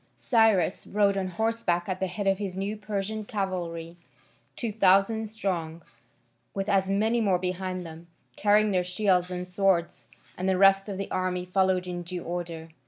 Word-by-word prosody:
Cyrus 220 Hz, -7 st, +2 dB
rode 200 Hz, -1 st, +2 dB
on 190 Hz, -1 st, -1 dB
horseback 185 Hz, -3 st, -1 dB
at 185 Hz, -1 st, -3 dB
the 190 Hz, -, 0 dB
head 200 Hz, +3 st, -4 dB
of 195 Hz, 0 st, +2 dB
his 195 Hz, -3 st, -4 dB
new 200 Hz, +2 st, -2 dB
Persian 215 Hz, 0 st, -4 dB
cavalry, 175 Hz, -5 st, -4 dB, 0.6 s
two 230 Hz, -, -3 dB
thousand 205 Hz, +2 st, +3 dB
strong, 170 Hz, -6 st, -3 dB, 0.7 s
with 195 Hz, 0 st, -2 dB
as 195 Hz, -2 st, +2 dB
many 220 Hz, +4 st, +2 dB
more 195 Hz, -4 st, +3 dB
behind 185 Hz, 0 st, -3 dB
them, 165 Hz, +1 st, -10 dB, 0.3 s
carrying 210 Hz, 0 st, +3 dB
their 180 Hz, -2 st, +2 dB
shields 180 Hz, -1 st, +1 dB
and 180 Hz, 0 st, -5 dB
swords, 180 Hz, -2 st, 0 dB, 0.3 s
and 185 Hz, +1 st, 0 dB
the 190 Hz, -, +2 dB
rest 195 Hz, +1 st, +5 dB
of 195 Hz, -, -4 dB
the 195 Hz, -, -5 dB
army 180 Hz, -1 st, -1 dB
followed 185 Hz, 0 st, +1 dB
in 175 Hz, -1 st, -4 dB
due 175 Hz, 0 st, -6 dB
order. 170 Hz, -2 st, -5 dB
190 Hz, 170 wpm, -27 LUFS, 180-205 Hz, 0.7 s, rest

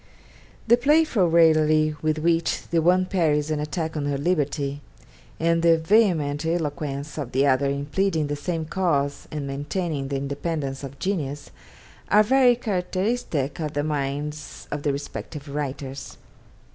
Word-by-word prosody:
The 235 Hz, +1 st, +5 dB
playful 275 Hz, -, +3 dB
raillery 155 Hz, -2 st, +4 dB
with 155 Hz, 0 st, 0 dB
which 165 Hz, +1 st, +1 dB
the 165 Hz, -1 st, +2 dB
one 180 Hz, +3 st, +3 dB
parries 155 Hz, -5 st, +1 dB
an 155 Hz, -, 0 dB
attack 160 Hz, +2 st, -3 dB
on 145 Hz, -2 st, -2 dB
her 140 Hz, -1 st, -1 dB
liberty, 145 Hz, -3 st, -1 dB, 0.6 s
and 165 Hz, 0 st, +2 dB
the 165 Hz, -1 st, +5 dB
vehement 160 Hz, -6 st, +2 dB
eloquence 150 Hz, -3 st, -3 dB
of 135 Hz, -4 st, -5 dB
the 135 Hz, +2 st, +3 dB
other 140 Hz, 0 st, +3 dB
in 140 Hz, +1 st, -2 dB
pleading 160 Hz, 0 st, 0 dB
the 145 Hz, 0 st, -2 dB
same 160 Hz, +2 st, -3 dB
cause 150 Hz, -6 st, -1 dB
and 150 Hz, -2 st, -4 dB
maintaining 145 Hz, +1 st, -3 dB
the 140 Hz, -, -3 dB
independence 140 Hz, 0 st, -3 dB
of 135 Hz, 0 st, -8 dB
genius, 145 Hz, -7 st, -3 dB, 0.6 s
are 210 Hz, +1 st, +6 dB
very 255 Hz, +1 st, +5 dB
characteristic 185 Hz, -, -2 dB
of 155 Hz, -2 st, -3 dB
the 145 Hz, -, -1 dB
minds 145 Hz, 0 st, -4 dB
of 150 Hz, -, -3 dB
the 145 Hz, -, +1 dB
respective 145 Hz, +1 st, -6 dB
writers. 140 Hz, -2 st, -5 dB
155 Hz, 145 wpm, -24 LUFS, 145-170 Hz, 0.6 s, are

